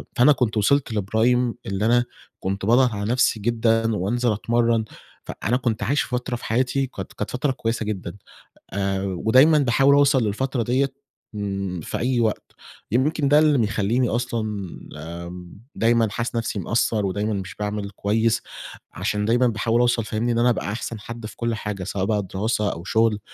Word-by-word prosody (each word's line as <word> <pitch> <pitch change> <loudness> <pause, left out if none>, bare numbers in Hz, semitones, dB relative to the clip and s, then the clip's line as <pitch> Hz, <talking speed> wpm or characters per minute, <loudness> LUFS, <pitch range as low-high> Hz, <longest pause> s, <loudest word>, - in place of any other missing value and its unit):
فأنا 125 +5 +6
كنت 120 -6 +1
وصِلت 130 +3 +2
لprime 115 +4 +1
اللي 100 +2 -1
أنا 120 +1 +3 0.3
كنت 95 +1 -3
باضغَط 125 +4 +5
على 105 +1 -2
نَفسي 125 -3 +2
جدًا 115 0 +1
وأنزِل 120 +5 0
أتمرّن. 115 +1 +1 0.4
فأنا 120 +4 -1
كنت 120 -4 -1
عايش 140 -1 +1
فترة 125 0 -3
في 120 - -8
حياتي 130 +4 0
كانت 95 -7 -8
كانت 105 - -4
فترة 130 +3 0
كويسة 115 -3 -2
جدًا، 95 -4 -4 0.6
آآ 95 -1 -1
ودايمًا 110 - +4
باحاول 135 +1 +4
أوصَل 140 -3 +4
للفترة 120 +4 -1
ديّة 130 +3 0 0.4
ن 100 -3 -3
في - - -4
أي 125 0 0
وقت، 110 -2 -1 0.4
يمكن 140 +5 +1
ده 145 +2 +6
اللي 150 -2 +4
بيخلّيني 115 +2 +1
أصلًا 120 -1 -1 0.6
آمم 85 +3 -8 0.2
دايمًا 115 0 +3
حاسس 120 +3 -3
نَفسي 115 -2 -2
مقصّر 110 +2 0
ودايمًا 105 +3 -1
مش 95 -3 -5
باعمل 105 -1 -3
كويس 110 +4 0 0.5
عشان 105 0 -1
دايمًا 120 +3 +3
باحاول 115 +1 +1
أوصَل 120 -1 +2
فاهمني، 110 +3 -1
إن 115 - +1
أنا 120 +1 +4
أبقى 110 -3 -1
أحسَن 115 0 -5
حد 115 +1 -8
في 110 - -8
كلّ 115 -1 -1
حاجة، 105 -3 -4
سواء 95 0 -2
بقى 105 -1 0
دراسة 105 +3 -1
أو 85 - -8
شغل 110 +2 +2
115 Hz, 170 wpm, -23 LUFS, 105-120 Hz, 0.6 s, فأنا